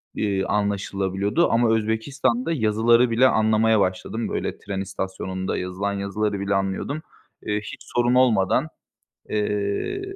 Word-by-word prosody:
eee, 100 -2 0
anlaşılabiliyordu 100 - 0
ama 115 -1 +3
Özbekistan'da 120 +5 0
yazıları 115 -1 +3
bile 125 +3 +5
anlamaya 110 -1 +3
başladım, 95 +4 -1
böyle, - - -3
tren 95 -1 -4
istasyonunda 95 -1 -4
yazılan 95 +2 -3
yazıları 100 +1 -2
bile 100 +1 -1
anlıyordum. 95 +10 -2 0.4
Eee, 105 0 0
hiç - - -8 0.2
sorun 120 +1 +3
olmadan, 125 +2 +3 0.6
eee, 105 - -1
105 Hz, 120 wpm, -23 LUFS, 100-115 Hz, 0.6 s, bile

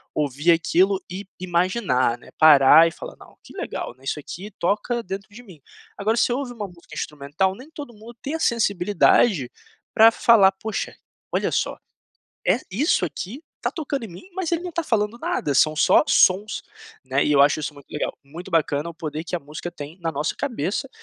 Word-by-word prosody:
ouvir 150 +3 +1
aquilo 185 +3 +2
e 190 +3 -7
imaginar, 175 - +1
né, - - -17
parar 155 +1 +8
e - - -3
falar: - - -9
"Não, - - -17
que - - -15
legal, - - -5
né, 130 - -24
isso 135 +2 -3
aqui 185 +7 -8
toca 215 +6 -1
dentro 195 +1 -6
de 235 +4 -12
mim". 180 - -15 0.4
Agora 220 +3 0
você 240 - +2
ouve 260 0 -3
uma 210 -4 -5
música 170 -3 -15
instrumental, 150 +6 -2
nem 260 +8 -13
todo 290 -6 -9
mundo 225 +2 -13
tem 285 - -3
a 325 - -2
sensibilidade 200 - +2 0.4
pra 225 +1 +7
falar: 215 -5 +5
"Puxa, 215 +2 -5 0.4
olha - - 0
só, - - -1 0.7
é, 250 - +3
isso 235 - +1
aqui 185 - -6 0.2
tá - - -1
tocando 285 - -4
em - - -7
mim, 180 - -12
mas 370 -3 -3
ele 335 +1 0
não 360 - -5
tá 340 0 -2
falando 215 -3 0
nada, 145 -10 -2
são 155 +3 +4
só 150 - +5
sons", 200 -4 +3 0.4
né, 135 +2 +1
e 150 - +2
eu 140 - +5
acho 145 +2 +4
isso 150 - -4
muito 140 -1 -15
legal. 150 - -3
Muito 165 +7 -10
bacana 155 -2 0
o - - -12
poder 155 -1 -5
que 175 - -5
a - - 0
música 150 +4 -7
tem 160 +1 -10
na 165 -1 -1
nossa 150 +4 -2
cabeça 260 -2 -2
185 Hz, 195 wpm, -23 LUFS, 155-225 Hz, 0.7 s, parar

